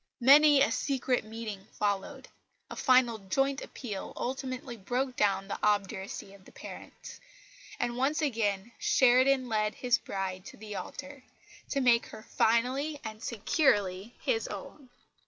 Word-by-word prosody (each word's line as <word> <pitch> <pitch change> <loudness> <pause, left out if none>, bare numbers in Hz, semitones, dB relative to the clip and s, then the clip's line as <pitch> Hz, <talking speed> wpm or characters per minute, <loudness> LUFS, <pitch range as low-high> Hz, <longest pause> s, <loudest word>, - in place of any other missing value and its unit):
Many 285 +2 +7
a 225 - +1
secret 255 0 0
meeting 215 -3 -7
followed; 210 +7 -2 0.4
a - - -5
final 250 -4 +3
joint 270 +8 0
appeal 210 -7 -6
ultimately 255 -1 -4
broke 250 +5 -2
down 195 -2 +1
the - - -4
obduracy 200 -1 -1
of 200 -1 -17
the - - -15
parents; - - -10 0.6
and 240 0 -1
once 270 +5 +1
again 225 -7 -1
Sheridan 260 +1 +4
led 215 -2 0
his 250 -1 +1
bride 190 -1 -4
to - - -11
the 210 -1 -8
altar, 280 +6 -7 0.5
to 275 - 0
make 240 -2 +4
her 215 - -11
finally 260 +8 +1
and 215 0 -7
securely 215 - 0
his 455 -2 0
own. 275 -4 -9
240 Hz, 135 wpm, -30 LUFS, 210-265 Hz, 0.6 s, Many